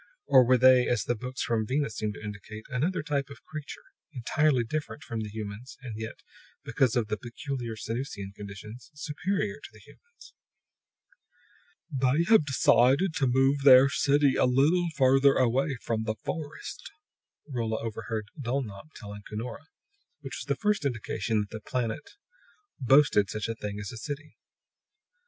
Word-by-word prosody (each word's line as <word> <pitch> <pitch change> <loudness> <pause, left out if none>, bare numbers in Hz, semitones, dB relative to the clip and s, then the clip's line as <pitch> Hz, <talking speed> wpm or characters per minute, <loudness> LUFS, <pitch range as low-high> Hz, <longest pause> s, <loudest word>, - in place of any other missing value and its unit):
Or 130 -2 +7
were 125 +1 +4
They, 130 0 +6
as 120 -4 +1
the 120 - 0
books 125 +3 -5
from 110 -2 0
Venus 135 -3 -1
seemed 105 -1 -2
to - - -10
indicate, 105 +1 -8
another 155 +7 -1
type 145 -2 -1
of 140 - -12
creature, 155 -1 -8 0.3
entirely 135 0 +1
different 150 +4 -4
from 115 - -5
the 110 -1 -4
humans, 110 +3 -7
and 120 -4 -6
yet, 110 +1 -7 0.4
because 130 -4 +1
of 120 -3 +1
the 105 - -2
peculiar 120 -1 -5
Sanusian 110 -3 -5
conditions, 105 +6 -10
superior 195 +8 -2
to - - -10
the - - -17
humans? 475 0 -18 1.6
"They 135 +3 +2
have 155 -9 +6
decided 135 +6 +4
to 135 - +2
move 135 +3 +3
their 135 0 +8
city 140 0 +3
a - - +3
little 145 +8 +3
farther 135 +1 +5
away 130 +2 +1
from 110 -1 -1
the 110 0 -1
forest," 155 -3 -6 0.6
Rolla 115 -5 -2
overheard 110 -1 -4
Dulnop 125 0 -4
telling 105 -2 -9
Cunora; 115 +8 -6 0.5
which 135 -2 -6
was - - -6
the 140 - -1
first 210 -4 +1
indication 115 -4 -1
that 105 - -7
the 110 - -6
planet 125 +5 -3 0.6
boasted 130 -6 +4
such 110 0 -3
a 115 - -2
thing 105 -2 -6
as 105 -2 -6
a 120 - -8
city. 145 +4 -7
125 Hz, 155 wpm, -28 LUFS, 110-140 Hz, 1.6 s, their